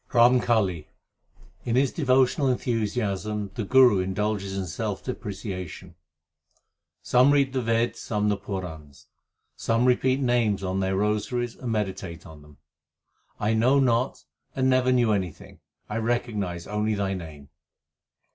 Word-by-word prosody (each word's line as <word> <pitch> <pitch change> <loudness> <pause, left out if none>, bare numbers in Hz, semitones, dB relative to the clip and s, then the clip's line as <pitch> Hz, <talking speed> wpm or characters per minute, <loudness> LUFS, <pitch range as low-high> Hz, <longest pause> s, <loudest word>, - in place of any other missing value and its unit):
RAMKALI 115 - +3 0.8
In 115 - -1
his 135 +1 +3
devotional 135 -1 +2
enthusiasm 105 -4 -1
the 115 - -3
Guru 125 -2 +5
indulges 100 +1 -2
in 95 - -2
self 80 -5 -4
depreciation: 95 -3 -6 1.1
Some 125 +2 +4
read 140 -2 +2
the 130 - 0
Veds, 115 +1 +1
1 - - -24
some 105 -1 -1
the 105 - +2
Purans: 80 -8 -7 0.5
Some 115 +2 0
repeat 130 +1 +2
names 120 -6 +1
2 95 - -3
on 95 +1 -1
their 95 0 0
rosaries 105 +4 -1
and 125 -3 -5
meditate 95 -5 -3
on 80 -2 -12
them. 75 -1 -18 0.8
I 105 +2 +1
know 125 +5 +3
not 125 -1 +1 0.3
and 130 -1 +1
never 130 -1 +3
knew 120 -3 +3
anything; 95 -6 -4 0.3
I 105 - -3
recognize 110 -7 -2
only 105 +1 -1
Thy 100 -1 -1
name. 80 -6 -9
105 Hz, 135 wpm, -25 LUFS, 95-125 Hz, 1.1 s, Guru